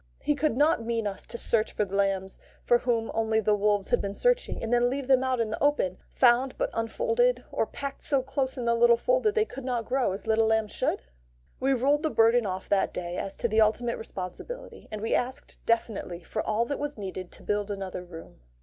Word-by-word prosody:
He 295 - +2
could 290 -3 0
not 295 -3 +3
mean 230 -1 -1
us 195 -2 -5
to 235 - -6
search 225 -2 +1
for 210 - 0
the 195 0 -6
lambs 195 -1 0 0.2
for 240 - +4
whom 235 -2 0
only 220 0 +1
the 215 -1 +2
wolves 205 -1 +1
had 245 - +2
been 200 0 -4
searching, - - +1
and 225 +1 -1
then 245 0 +4
leave 275 +1 -3
them 260 0 +4
out 260 -1 0
in 225 -2 0
the 220 - -3
open, 285 -11 +1
found 255 +1 +3
but - - -1
unfolded, 485 - +1
or - - 0
packed 280 -1 -6
so 275 -3 +1
close 265 0 -2
in 245 - -3
the 235 - +3
little 235 0 +5
fold - - +2
that 430 -2 +1
they 435 -1 +3
could 270 - -9
not 245 -3 -2
grow 260 -3 +1
as 195 +4 -6
little 220 0 +3
lambs 220 -1 +1
should? - - -1 0.6
We 270 +1 +2
rolled 280 +4 +2
the 315 - 0
burden 230 -3 +4
off 185 0 -4
that 200 -1 +1
day 175 0 -4
as 195 - -5
to - - 0
the 220 0 +3
ultimate 235 +2 +2
responsibility, 225 - -7
and 215 -1 -6
we 225 - -1
asked 255 +2 -2
definitely 210 -6 -1
for 215 - -3
all 220 +2 0
that 285 +4 -3
was 290 -2 -4
needed 185 -3 -6
to - - -11
build 205 0 -1
another 195 -3 -5
room. 165 - -12
230 Hz, 230 wpm, -27 LUFS, 205-265 Hz, 0.6 s, little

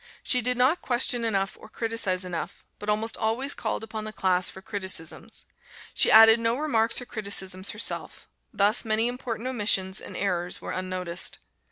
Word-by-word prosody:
She 250 - +1
did 250 +1 -1
not 260 +8 +3
question 245 -1 0
enough 195 -4 0
or 220 - -13
criticise 225 -6 -1
enough, 175 -2 -5
but 210 - -5
almost 215 +2 0
always 240 +6 +1
called - - -3
upon 220 -1 -5
the 215 - -5
class 185 -3 +1
for - - -11
criticisms. 190 -5 -3 0.5
She - - +4
added 225 +1 +8
no 230 0 +1
remarks 230 -7 +1
or - - -7
criticisms 200 -4 -1
herself; 210 - -3 0.2
thus 205 +3 +4
many 225 0 +1
important 245 -1 -4
omissions 205 -6 0
and - - -8
errors 180 -3 -1
were - - -6
unnoticed. 185 -2 -3
215 Hz, 165 wpm, -26 LUFS, 190-230 Hz, 0.5 s, added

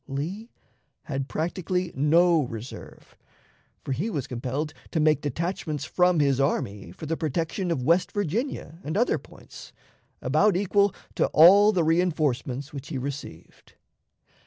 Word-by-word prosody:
Lee 170 - -5 0.5
had 135 -2 -4
practically 180 +2 -2
no 165 +4 +4
reserve, 120 -2 -8 0.7
for - - -5
he 160 - -1
was 145 - -3
compelled 130 +5 -4 0.2
to 160 - -1
make 150 -2 +3
detachments 155 +1 -3
from 180 -2 +2
his 140 -2 +2
army 100 -9 -1
for 125 - -9
the 165 +2 -1
protection 165 +4 -2
of 140 -7 -1
West 170 +6 +2
Virginia 205 - -3
and 155 +5 -3
other 240 - +2
points, - - -14 0.5
about 210 -4 +2
equal 200 +1 +2 0.2
to - - +1
all 200 +6 +8
the 180 -5 +1
reënforcements 150 -5 0
which 140 -1 -7
he 150 - -4
received. 135 - -8
155 Hz, 135 wpm, -26 LUFS, 135-180 Hz, 0.7 s, all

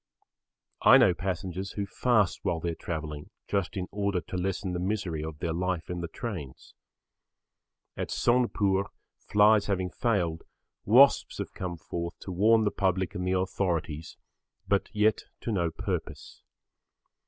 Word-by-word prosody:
I - - +8
know 120 -9 +5
passengers 95 +1 -4
who 100 - -2
fast 105 -1 +1
while 85 - -1
they 85 +1 -2
are - - -4
travelling 80 -3 -5 0.2
just 100 0 -1
in 90 -1 -3
order 100 -2 0
to 90 - -8
lessen 90 0 -2
the 90 - -2
misery 90 -5 -2
of 80 -1 -6
their 80 +1 -2
life 90 0 -2
in 90 0 -3
the 85 - -3
trains. 80 - -7 1.2
At - - -4
Sonepur 105 -6 +2 0.4
flies 105 0 +5
having 95 -3 -1
failed, 90 -10 0 0.4
wasps 130 +7 +5
have - - -5
come 90 -2 -5
forth 85 +1 -5
to 95 - -6
warn 110 +5 +4
the 105 - +1
public 95 -1 0
and 90 -2 -3
the 95 - +1
authorities, 85 -4 -2 0.5
but 100 +1 +1
yet 105 0 +2 0.2
to 115 - -3
no 85 -5 +1
purpose. - - -5
95 Hz, 150 wpm, -28 LUFS, 85-105 Hz, 1.2 s, I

